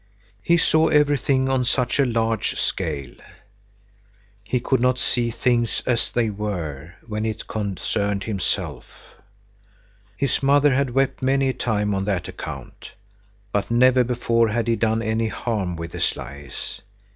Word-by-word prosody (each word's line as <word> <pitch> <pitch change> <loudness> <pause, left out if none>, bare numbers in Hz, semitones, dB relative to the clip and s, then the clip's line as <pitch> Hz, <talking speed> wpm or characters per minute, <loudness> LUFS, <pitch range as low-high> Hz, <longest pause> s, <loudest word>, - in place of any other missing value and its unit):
He 170 +8 +3
saw 160 -1 +3
everything 145 -2 +3
on 130 -1 +1
such 125 +2 0
a 140 - +4
large 115 -2 0
scale. 70 -6 -2 1.3
He 125 +5 0
could 130 +1 +1
not 125 0 +3
see 120 -2 +1
things 120 0 0
as 120 -2 +1
they 115 -3 +1
were, 90 -7 -5
when 105 -1 -3
it 110 -1 -3
concerned 100 -1 -2
himself. 100 -5 -3 1.3
His 140 -1 0
mother 140 +1 +4
had 140 0 +1
wept 135 0 +1
many 135 +1 +2
a - - 0
time 105 -4 0
on 95 0 -1
that 95 -3 -1
account. - - -8 0.6
But 100 -1 -1
never 125 +2 +5
before 115 -1 +1
had 115 +2 -1
he 115 - +3
done 110 +1 +1
any 110 0 0
harm 105 -6 -2
with 85 0 -6
his - - 0
lies. 70 +1 -8
115 Hz, 145 wpm, -23 LUFS, 100-130 Hz, 1.3 s, never